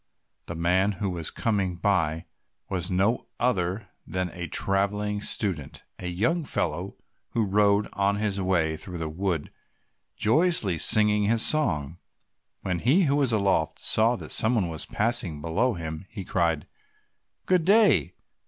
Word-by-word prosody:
The 85 - -6
man 90 +5 +1
who 95 0 -3
was 85 -3 -4
coming 100 -5 -1
by 80 -4 0 0.4
was 90 -1 -3
no 100 +6 0
other 100 -4 -1 0.2
than 90 -1 -2
a 90 -2 -6
travelling 100 +4 0
student, 90 -10 -1 0.2
a 90 - -5
young 115 - 0
fellow 90 - -3 0.4
who 115 -2 +1
rode 100 +1 +2
on 100 0 +1
his 100 -2 -2
way 85 -4 0
through 90 +2 -7
the 80 -1 -4
wood 85 -1 -3 0.7
joyously 115 - +2
singing 105 0 +5
his 115 +2 +4
song. 85 - +1 0.6
When 90 -2 -2
he 145 - +3
who 140 -3 +1
was 135 -4 +1
aloft 100 -7 0
saw 115 +3 +2
that - - -8
someone 110 -6 +2
was 80 -2 -5
passing 105 -9 0
below 100 +11 0
him, 80 +1 -6
he 100 -5 -8
cried, 85 -5 0 0.8
"Good 180 -3 +2
day! 205 +4 +3
100 Hz, 145 wpm, -26 LUFS, 85-110 Hz, 0.8 s, singing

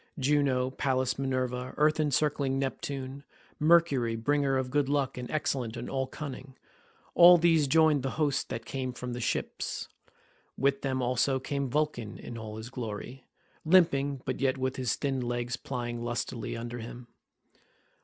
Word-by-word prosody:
Juno, 135 -2 +2
Pallas 130 -1 0
Minerva, 130 -1 -2
earth 155 +1 +3
encircling 145 -2 +1
Neptune, 135 0 -4 0.4
Mercury 150 -8 +4
bringer 135 +3 +1
of 130 -1 -2
good 145 -1 +1
luck 140 -2 0
and 125 -1 -6
excellent 130 -6 -1
in - - -5
all 130 -1 -1
cunning—all 150 +5 +2
these 165 -3 +4
joined 155 -1 +4
the 135 - -2
host 145 -4 0
that 115 0 -5
came 130 -1 -3
from 125 0 -5
the 120 - -4
ships; - - -3 0.7
with 140 +1 +1
them 130 -2 -1
also 125 +2 +1
came 140 0 -2
Vulcan 130 -6 -1
in 120 - -8
all 110 -1 -7
his 110 +3 -8
glory, 120 +1 -6 0.4
limping, 145 -6 +3
but 130 - -3
yet 135 0 +2
with 130 0 -1
his 125 -4 0
thin 135 -2 -1
legs 120 0 -2
plying 120 -2 -4
lustily 120 -1 -3
under 120 +1 -5
him. 120 +1 -8
130 Hz, 150 wpm, -29 LUFS, 125-145 Hz, 0.7 s, Mercury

